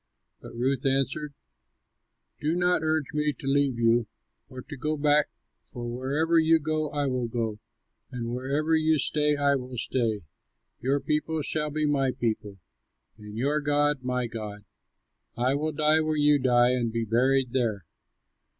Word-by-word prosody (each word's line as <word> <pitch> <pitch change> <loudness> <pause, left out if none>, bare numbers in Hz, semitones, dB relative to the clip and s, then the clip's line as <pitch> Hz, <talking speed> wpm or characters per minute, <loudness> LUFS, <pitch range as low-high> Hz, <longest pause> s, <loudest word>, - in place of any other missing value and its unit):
But - - -11
Ruth 130 +2 0
answered, 135 +2 0 1.0
"Do 155 +3 0
not 180 -1 +2
urge 155 -2 -1
me 150 0 +1
to 135 - -12
leave 135 -2 +2
you 115 0 +3 0.4
or 130 -2 -9
to 145 - -9
go 150 +3 -2
back, 150 0 +3 0.3
for 120 -2 -7
wherever 140 +7 +1
you 160 0 +5
go 155 0 -2
I 145 0 -1
will 125 -3 -1
go, 115 -2 -3 0.5
and 120 -2 -5
wherever 140 +6 0
you 160 0 +3
stay 150 0 +1
I 140 0 +3
will 125 -1 -7
stay; 115 -5 -1 0.6
your 135 +3 +1
people 155 +1 -1
shall 150 +1 -1
be 155 +1 -1
my 135 -3 +1
people, 110 -4 -3 0.6
and 105 0 -9
your 145 +5 +1
God 145 -1 +1
my 125 -1 -1
God; 105 -3 -7 0.7
I 125 +2 +2
will 155 +2 -1
die 155 +1 +3
where 155 -1 0
you 145 0 +4
die 125 -1 +4
and 120 -2 0
be 115 0 -2
buried 125 +3 +2
there. 110 -8 -1
135 Hz, 160 wpm, -27 LUFS, 120-150 Hz, 1.0 s, you